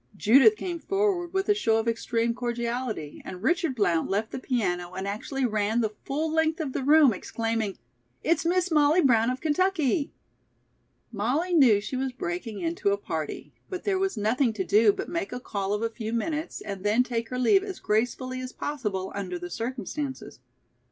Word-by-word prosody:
Judith 270 - +6
came 350 -4 -4
forward 390 -2 0
with 385 0 -1
a 415 - +5
show 225 - +2
of 225 +1 -1
extreme 230 0 0
cordiality 235 - -3
and 185 +1 -8
Richard 330 -2 +1
Blount 175 -7 +1
left 210 +3 -1
the - - -4
piano 180 -9 -1
and 190 +1 -4
actually 255 +6 -2
ran 215 0 +1
the 215 -2 -1
full 310 +3 -1
length 320 0 +1
of 290 -5 -3
the - - -2
room, 290 -2 +6
exclaiming: 225 0 -2 0.5
"It's 335 +2 +2
Miss 360 +1 +1
Molly 305 +3 +4
Brown 230 -5 +4
of 255 +1 -3
Kentucky!" 315 -2 +1 1.0
Molly 255 - -1
knew 255 -11 +6
she 210 +6 -4
was 260 0 -2
breaking 200 0 -4
into 345 +4 0
a 400 - +2
party, - - -5 0.2
but 370 -2 -5
there 385 -2 +1
was 385 -8 -1
nothing 225 +3 +1
to 205 -3 -2
do 210 +4 +5
but - - -5
make 345 +3 -3
a 250 - -4
call 200 -5 -3
of 210 +2 -1
a 230 - +1
few 225 -1 -5
minutes 305 +7 -2
and 195 -2 -6
then 215 +4 +3
take 235 -2 -3
her 250 - -3
leave 385 - +4
as 390 -2 -6
gracefully 250 +4 -1
as 255 0 -6
possible 210 -10 -3
under 185 -3 -4
the 175 0 -7
circumstances. 260 - -5
250 Hz, 185 wpm, -27 LUFS, 215-315 Hz, 1.0 s, Judith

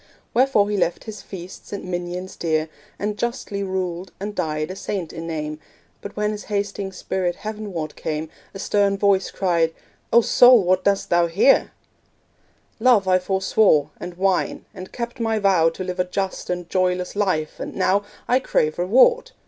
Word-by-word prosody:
Wherefore 245 -5 +3
he 205 - 0
left 175 -2 0
his 215 -2 -8
feasts 185 -1 -10
and 200 - -5
minions 180 +1 -4
dear, 155 -1 -1 0.3
And 210 +1 -3
justly 235 -4 -3
ruled, 185 -2 -3
and 205 +2 -4
died 155 -3 -2
a - - -6
saint 190 -3 -4
in 165 0 -6
name. 155 -1 -4 0.4
But 200 - -8
when 210 0 0
his 210 -1 -6
hasting 200 -1 -2
spirit 185 -1 -2
heavenward 205 -8 -5
came, 155 0 -3 0.3
A - - -4
stern 200 0 +1
voice 195 -1 +2
cried 170 -4 0 0.4
'O 235 - +7
Soul! 245 -1 +6
what 185 +1 +2
dost 200 -1 +1
thou 175 0 +4
here?' 195 +11 +4 1.1
'Love 225 -5 +4
I 185 0 +4
forswore, 190 -5 +2
and 175 0 -7
wine, 190 0 0
and 185 0 -9
kept 240 +1 -5
my 225 -1 0
vow 190 -5 +4
To 175 +3 -6
live 180 0 -5
a 180 - +2
just 190 +1 -3
and 180 -1 -3
joyless 180 0 0
life, 185 -7 -1
and - - -6
now 200 +2 +2 0.2
I 250 - +4
crave 155 -10 0
reward.' 260 - +4
190 Hz, 170 wpm, -22 LUFS, 175-205 Hz, 1.1 s, O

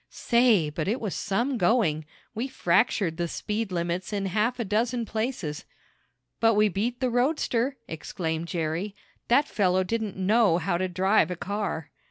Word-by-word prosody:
Say, 235 -10 +3
but 155 +2 -3
it 230 +6 0
was 210 -5 -3
some 240 +6 -1
going! 175 -7 +2 0.3
We 235 +5 -2
fractured 185 -6 +1
the 175 -1 -1
speed 210 +4 -3
limits 175 +2 -2
in 200 -2 -1
half 215 +6 0
a 235 - -1
dozen 230 +4 0
places." 220 - -3 0.8
"But 225 -1 +4
we 210 0 +4
beat 225 +7 -2
the 255 -1 +1
roadster!" 255 0 +1
exclaimed 160 0 -4
Jerry. 170 +4 -2 0.3
"That 280 +5 +4
fellow 185 -2 +2
didn't 220 0 -3
know 195 -1 +3
how 175 0 -1
to 185 - 0
drive 185 0 +2
a 180 - -3
car." 190 -5 -4
200 Hz, 160 wpm, -26 LUFS, 175-230 Hz, 0.8 s, But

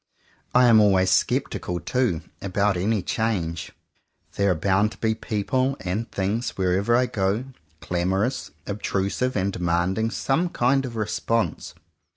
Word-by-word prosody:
I 125 0 +7
am 115 -2 +7
always 95 -3 +4
sceptical 90 -1 0
too, 125 -5 0 0.2
about 100 +1 +1
any 100 +2 0
change. 90 -8 -2 0.6
There 100 0 +2
are 90 - +2
bound 100 +6 +1
to - - -16
be 110 -1 +1
people 130 +5 -1
and 100 +6 -3
things, 100 +5 -2
wherever 95 +5 +2
I 125 +1 +3
go, 100 0 -1 0.4
clamorous, 95 - -1 0.2
obtrusive, 100 +4 -1
and 100 -1 0
demanding 90 +5 0
some 160 +9 0
kind 135 -1 +1
of 120 - -8
response. 115 +1 -1
100 Hz, 135 wpm, -24 LUFS, 95-115 Hz, 0.6 s, I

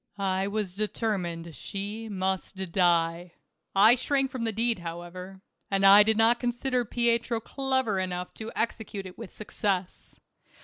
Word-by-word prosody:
1 195 -1 -1
was 205 -3 -3
determined 185 -6 -3
she 205 - -5
must 190 -1 -2 0.2
die. 170 -1 +1 0.4
I 210 +4 +8
shrank 270 +2 0
from 245 -3 -3
the 225 - 0
deed, 230 0 0
however, 175 +3 -8 0.3
and 195 0 +1
I 200 +1 +10
did 220 +1 +3
not 230 +2 +4
consider 245 +1 -1
Pietro 235 0 +1
clever 260 -4 -1
enough 180 -1 -4
to 220 0 -7
execute 220 -3 -3
it 185 -1 -9
with 230 -5 -8
success. 195 -3 -4
205 Hz, 140 wpm, -27 LUFS, 185-230 Hz, 0.4 s, I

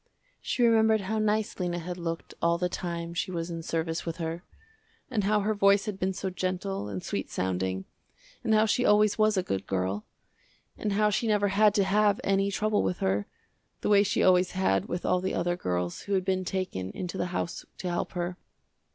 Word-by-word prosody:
She 245 - 0
remembered 220 -2 +4
how 215 +3 -2
nice 215 0 0
Lena 175 -1 -1
had 175 +1 -5
looked 165 -1 -4
all 170 0 +3
the 180 +1 0
time 170 -2 -4
she 170 - -2
was 170 -1 -3
in 165 -1 -4
service 165 0 -2
with 165 -1 -4
her, 165 0 -3 0.7
and 210 -5 0
how 210 +1 +3
her 215 +2 +1
voice 200 0 +4
had 205 -3 -4
been 190 +1 +1
so 190 0 -3
gentle 185 - -3
and 95 -3 -5
sweet - - -3
sounding, 95 0 -2 0.6
and 225 - 0
how 215 +1 +5
she 235 +3 +1
always 210 -1 +4
was 215 -1 +4
a 185 - +2
good 95 - -3
girl, 95 +2 -1 0.7
and 210 -2 -2
how 210 +1 +3
she 230 +3 0
never 205 -2 +2
had 205 +1 +4
to 200 - +4
have 205 +1 +3
any 195 0 +2
trouble 210 +1 +1
with 180 - -1
her, 95 +2 0 0.5
the - - -1
way 205 -1 +6
she 200 -1 +1
always 180 -1 +4
had 185 - +1
with 175 - -3
all 180 - +2
the 190 - -1
other 175 +1 0
girls 90 - -2
who 200 - -4
had 190 -1 +1
been 185 -1 0
taken 180 - -3
into 180 0 -5
the 180 - 0
house 175 -1 -3
to 185 - -5
help 175 -1 -2
her. 175 0 -3
185 Hz, 210 wpm, -28 LUFS, 170-205 Hz, 0.7 s, way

